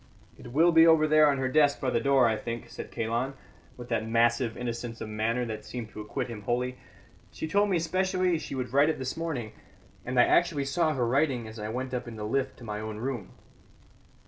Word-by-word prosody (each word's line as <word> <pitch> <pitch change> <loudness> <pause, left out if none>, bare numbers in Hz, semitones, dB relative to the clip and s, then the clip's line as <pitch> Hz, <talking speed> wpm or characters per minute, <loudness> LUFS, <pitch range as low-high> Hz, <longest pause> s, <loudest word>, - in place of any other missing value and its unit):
"It - - -12
will 165 +6 +4
be 165 0 +7
over 160 -1 +5
there 155 0 +6
on 140 - +1
her 130 -1 0
desk 145 +1 +3
by 130 - -1
the 115 - +2
door, 135 0 +4
I 110 - +1
think," 115 +1 -6
said - - -7
Kalon, 120 +4 -2 0.4
with 120 0 -9
that 110 -2 -1
massive 120 0 +2
innocence 120 -1 -5
of 110 - -6
manner 115 +3 -1
that 110 -2 -5
seemed 120 -3 -6
to 105 - -8
acquit 125 +4 -4
him 115 -3 -7
wholly. 125 +4 -2 0.5
"She - - -5
told 205 +5 +2
me 185 - +2
specially 185 +1 0
she - - -6
would 125 -1 -4
write 140 +3 +5
it 160 - -1
this 130 0 -4
morning, 145 -10 -4 0.5
and 125 0 -1
I - - +8
actually 160 -5 +2
saw 155 +2 +1
her 125 -2 +1
writing 130 -2 +1
as 110 +1 -9
I 105 0 -4
went 130 +3 -4
up 125 -1 -3
in 115 - -7
the 105 - -6
lift 135 +5 -1
to - - -13
my 105 -2 -4
own 110 0 -5
room." 120 -3 -4
125 Hz, 225 wpm, -28 LUFS, 115-150 Hz, 0.5 s, I